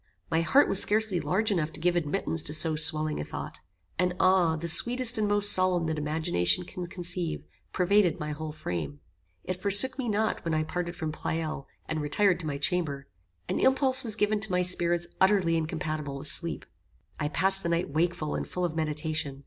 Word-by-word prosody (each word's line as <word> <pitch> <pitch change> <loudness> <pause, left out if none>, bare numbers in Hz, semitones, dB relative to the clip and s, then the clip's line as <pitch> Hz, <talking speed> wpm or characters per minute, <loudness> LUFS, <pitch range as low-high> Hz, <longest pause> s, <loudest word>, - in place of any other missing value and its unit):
My 160 - +1
heart 275 +12 +3
was 195 - +6
scarcely 215 -3 +1
large 215 +6 -1
enough 160 -5 -2
to - - -10
give 175 0 0
admittance 165 0 -1
to 150 +1 -1
so 160 0 +3
swelling 155 0 +4
a - - -4
thought. - - -8 0.4
An 180 0 0
awe, 185 -3 +2
the 165 +2 -5
sweetest 240 +6 +7
and 210 - 0
most 205 0 +3
solemn 185 -2 +3
that 160 -1 -3
imagination 150 - 0
can 180 0 -8
conceive, 175 -2 -4 0.3
pervaded 190 -1 +1
my 150 0 -5
whole 155 +1 -7
frame. 85 - -6 0.4
It 185 0 -6
forsook 205 +8 +4
me 245 -3 -3
not 215 +1 -2
when 165 -2 -2
I 155 - -1
parted 175 +2 -5
from 155 -2 -5
Pleyel 155 -2 -5 0.2
and 160 -1 -4
retired 180 +6 0
to 160 - -6
my 145 -2 -4
chamber. 145 -4 -3 0.4
An - - -3
impulse 265 0 +3
was 220 -3 +1
given 210 0 -1
to 205 -1 0
my 180 0 0
spirits 175 -1 +1 0.2
utterly 190 -4 +2
incompatible 155 -3 -4
with 140 +2 -2
sleep. 170 -1 -1 0.5
I 145 - -2
passed 190 +5 +2
the 170 - -4
night 170 -3 -2
wakeful 160 0 -2
and - - -5
full 180 0 -4
of 165 -2 -5
meditation. 155 -2 -4
170 Hz, 195 wpm, -26 LUFS, 155-190 Hz, 0.5 s, sweetest